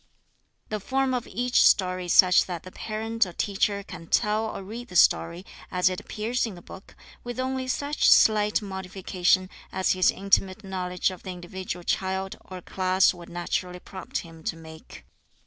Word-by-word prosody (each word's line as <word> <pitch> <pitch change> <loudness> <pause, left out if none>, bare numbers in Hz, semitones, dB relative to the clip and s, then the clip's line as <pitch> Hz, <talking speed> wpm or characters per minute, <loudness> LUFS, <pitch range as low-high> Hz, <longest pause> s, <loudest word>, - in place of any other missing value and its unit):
The 215 - -2
form 265 +5 0
of 245 -2 -2
each 245 +5 +1
story 185 -1 +3
is 175 - 0
such 180 -1 +6
that 175 -3 -5
the 185 - -10
parent 225 0 -1
or 180 - -9
teacher 200 +2 0
can 165 -4 -10
tell 215 +4 +1
or 205 - -6
read 230 +5 -8
the 180 - -12
story, 170 +1 +3 0.2
as 180 0 +2
it 185 - -4
appears 230 +3 -2
in 210 - -7
the 175 - -12
book, 190 - -13 0.3
with 245 0 -6
only 260 0 -2
such 285 +3 +1
slight 210 -1 +5
modification 190 -1 0 0.2
as 190 - +1
his 185 -1 +3
intimate 195 +1 +1
knowledge 185 -1 -2
of 185 - -10
the - - -8
individual 180 0 -6
child 190 +1 -1
or 185 -1 -9
class 185 0 +2
would 175 -1 -12
naturally 180 +1 -3
prompt 190 +1 -6
him 165 -1 -13
to - - -1
make. 160 -1 -13
190 Hz, 175 wpm, -26 LUFS, 180-215 Hz, 0.3 s, such